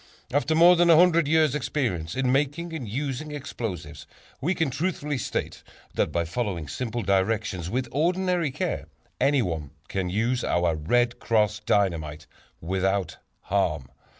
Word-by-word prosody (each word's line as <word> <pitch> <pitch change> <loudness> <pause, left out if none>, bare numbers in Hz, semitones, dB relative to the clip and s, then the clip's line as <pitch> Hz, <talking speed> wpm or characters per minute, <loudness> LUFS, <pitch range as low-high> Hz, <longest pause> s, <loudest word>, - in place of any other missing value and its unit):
After 145 +2 +2
more 175 +2 +7
than 175 0 +4
a 165 - +8
hundred 170 -2 +5
years' 155 -2 +3
experience 120 - -2
in 130 -1 +1
making 150 +5 0
and 130 -9 -5
using 140 +5 -3
explosives, 115 - -6 0.3
we 175 +7 +1
can 160 -5 0
truthfully 150 -2 -2
state - - -3 0.3
that - - 0
by 85 -1 0
following 90 -4 -3
simple 120 - -3
directions 95 -2 0
with 125 +4 -1
ordinary 175 +2 +1
care, 130 - -3 0.3
anyone 90 - +1 0.2
can 95 -2 -2
use 115 +6 0
our 85 -1 +1
"Red 120 +11 +1
Cross" 105 -2 +1
Dynamite 80 -6 0 0.4
without 95 -1 -1 0.2
harm. 80 -9 -1
120 Hz, 140 wpm, -26 LUFS, 90-150 Hz, 0.4 s, a